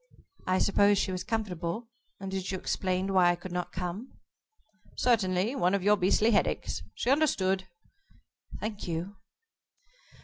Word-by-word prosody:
"I 185 0 +3
suppose 200 +1 +4
she 190 - 0
was 185 -1 -3
comfortable, 210 -1 -3 0.3
and 195 0 -6
that 190 -1 -3
you 190 - -2
explained 185 +1 -1
why 180 -2 +5
I 175 - +3
could 175 +1 -9
not 180 0 -3
come?" 185 +7 -5 0.8
"Certainly. 205 -2 +2
One 190 -8 +2
of 195 - -2
your 205 +1 +5
beastly 205 +4 +3
head 210 - +4
aches. - - -3
She 250 - 0
understood." 195 -11 +2 0.9
"Thank 215 -2 -5
you." 175 +4 -4
190 Hz, 145 wpm, -29 LUFS, 180-210 Hz, 0.9 s, why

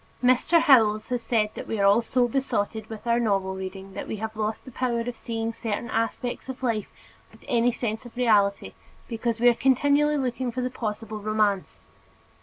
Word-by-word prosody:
Mr. 255 +7 +4
Howells 225 -9 +4
has 245 -1 -1
said 215 -3 +1
that - - -8
we 220 - -3
are 200 - +3
all 200 +4 +5
so 245 +1 +1
besotted 225 -4 -2
with 220 0 -8
our 235 0 +2
novel 195 -4 0
reading 190 +1 -7
that - - -6
we - - -3
have 220 +1 -5
lost 215 0 -3
the 260 - -10
power 240 -1 -1
of 240 +1 -4
seeing 225 -1 -4
certain 225 +1 -4
aspects 230 +3 -2
of 260 0 -7
life 225 -4 -1 0.4
with - - -19
any 245 -2 +3
sense 225 -1 -3
of 240 0 -13
reality 205 -5 +2 0.3
because 230 -1 -2
we 240 - +4
are 240 - +7
continually 285 +4 +3
looking 255 -2 -2
for 255 +2 -3
the 250 0 -2
possible 215 -2 -4
romance. 210 -2 0
230 Hz, 195 wpm, -25 LUFS, 215-250 Hz, 0.4 s, are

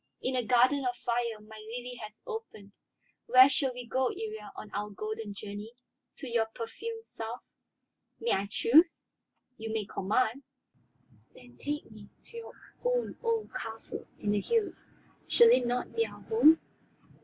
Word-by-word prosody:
In 260 - -1
a 250 - +1
garden 255 +4 +4
of 245 -1 0
fire 235 -2 -1
my 215 +1 -12
lily 245 +3 -6
has 215 0 -10
opened. 445 - -7 0.6
Where 255 +1 +9
shall 270 -1 +1
we 250 0 -7
go, 255 +2 +1
Iría, 435 +1 -5
on 210 - -9
our 210 +1 -2
golden 215 +1 -5
journey? 205 +3 -7 0.4
To 275 - -7
your 230 -2 +1
perfumed 450 - -6
South?" 230 - -6 0.8
"May 470 - 0
I 195 +1 +1
choose?" 310 - +5 0.6
"You 220 0 -4
may 220 -2 -1
command." 220 +7 0 0.9
"Then 245 -1 -15
take 295 -3 -4
me 210 -1 -12
to 465 - -10
your 460 - -8 0.3
own - - 0
old 460 -2 -1
castle 225 0 -6
in 205 - -1
the 205 -1 +2
hills. 455 - 0 0.4
Shall 470 -1 +7
it 255 - +5
not 245 +1 -1
be 455 - +3
our - - -12
home?" 325 -8 +6
245 Hz, 155 wpm, -31 LUFS, 220-320 Hz, 0.9 s, Where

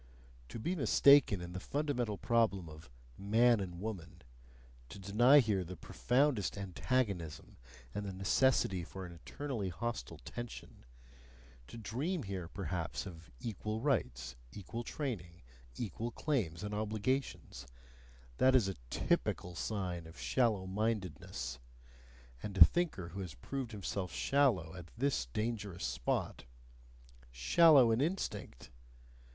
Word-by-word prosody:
To - - -6
be 170 +12 -1
mistaken 140 - +5
in 90 0 -7
the 95 - -4
fundamental 125 -4 -1
problem 110 -7 +1
of 75 -3 -12 0.3
"man 115 +4 +4
and 90 -3 -5
woman," 90 -4 -6 0.7
to - - -9
deny 110 +8 +5
here 105 -8 +3
the 90 +1 -8
profoundest 125 - +1
antagonism 95 -5 -2 0.4
and 105 - -3
the - - -3
necessity 95 -1 +2
for 95 +3 -7
an 90 - -9
eternally 105 - -4
hostile 90 - -4
tension, 120 - -8 0.8
to 115 - -10
dream 135 - -2
here 95 -4 -4
perhaps 90 -2 -4
of 85 -5 -10
equal 110 0 -3
rights, 70 - -1 0.2
equal 105 +7 -6
training, 95 - -5 0.3
equal 115 - -3
claims 110 - -1
and 105 0 -4
obligations: 105 - -2 0.7
that 130 0 +5
is 120 -6 +4
a 95 - -4
TYPICAL 90 +7 0
sign 90 -3 -3
of 80 - -13
shallow 110 -7 +1
mindedness; 95 - -3 0.8
and 100 -2 -5
a 85 - +12
thinker 155 - -1
who 95 - -7
has 90 -7 -6
proved 125 - -5
himself 100 -3 -3
shallow 120 - +2
at 90 -2 -10
this 135 - 0
dangerous 105 - -3
spot - - -2 0.8
shallow 125 - +6
in 115 +3 +2
instinct! 155 - -3
100 Hz, 125 wpm, -34 LUFS, 90-120 Hz, 0.8 s, a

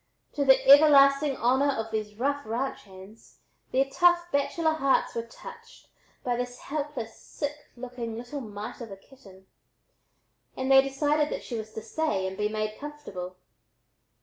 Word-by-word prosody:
To 285 - 0
the 265 -1 +4
everlasting 275 -1 +6
honor 265 +4 +2
of 225 -2 -4
these 215 -1 -4
rough 285 +5 -1
ranch 240 +4 -4
hands, 195 +3 -16 0.3
their 265 +1 +2
tough 345 +4 +2
bachelor 315 +3 +1
hearts 275 -4 +1
were 230 - -2
touched 460 - -13 0.3
by 245 -1 0
this 245 0 -4
helpless, 285 -6 -5
sick 295 0 -6
looking 240 -2 -6
little 245 +4 -6
mite 210 0 -8
of 230 - -7
a 195 - -9
kitten, 195 -5 -18 1.1
and 260 +1 -1
they 270 0 +8
decided 290 +2 0
that - - -5
she - - -8
was 220 -1 -6
to 220 - -7
stay 225 -5 -1
and 190 0 -4
be 210 +1 -1
made 215 0 -3
comfortable. 280 -12 -8
265 Hz, 155 wpm, -27 LUFS, 220-290 Hz, 1.1 s, they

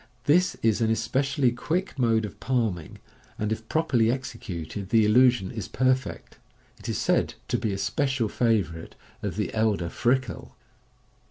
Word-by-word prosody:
This 175 +5 +3
is 110 0 +2
an 110 0 +3
specially 135 +1 +1
quick 165 +7 -3
mode 115 -3 +2
of 100 - -10
palming, 110 -11 -1 0.4
and 105 0 -2
if 110 0 -4
properly 120 -8 +2
executed 100 -7 -5
the 110 -1 +4
illusion 120 -2 +4
is 110 -5 -5
perfect. 130 0 -1 0.4
It - - -7
is - - -1
said - - +1
to - - +1
be 110 - -1
a 95 - -2
special 120 +5 0
favourite 100 -9 -1 0.3
of - - -3
the - - -2
elder 105 -6 +1
Frikell. 130 +7 -1
115 Hz, 150 wpm, -26 LUFS, 105-130 Hz, 0.4 s, the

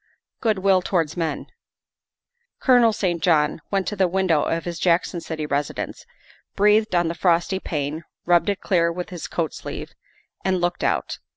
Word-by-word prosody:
" - - -55
Good 220 -4 +2
will 190 -1 +3
towards 165 -4 -1
men." 165 -4 -2 1.1
Colonel 245 -3 +5
St. 175 -5 -1
John 155 -2 +2
went 195 -2 0
to 210 - -5
the 190 -2 +3
window 180 -4 +2
of 165 +2 -1
his 170 -1 -4
Jackson 175 0 +1
City 155 -2 -4
residence, 145 0 -3 0.5
breathed 210 0 +3
on 175 -1 +3
the 165 - -1
frosty 175 +2 +1
pane, 150 -1 -3 0.2
rubbed 175 +1 +3
it 200 - -2
clear 170 -3 +2
with 180 +1 -6
his 175 -3 -6
coat 165 -3 -2
sleeve, - - -7 0.5
and 190 -1 +1
looked 175 0 -1
out. - - -1
175 Hz, 170 wpm, -23 LUFS, 165-190 Hz, 1.1 s, Colonel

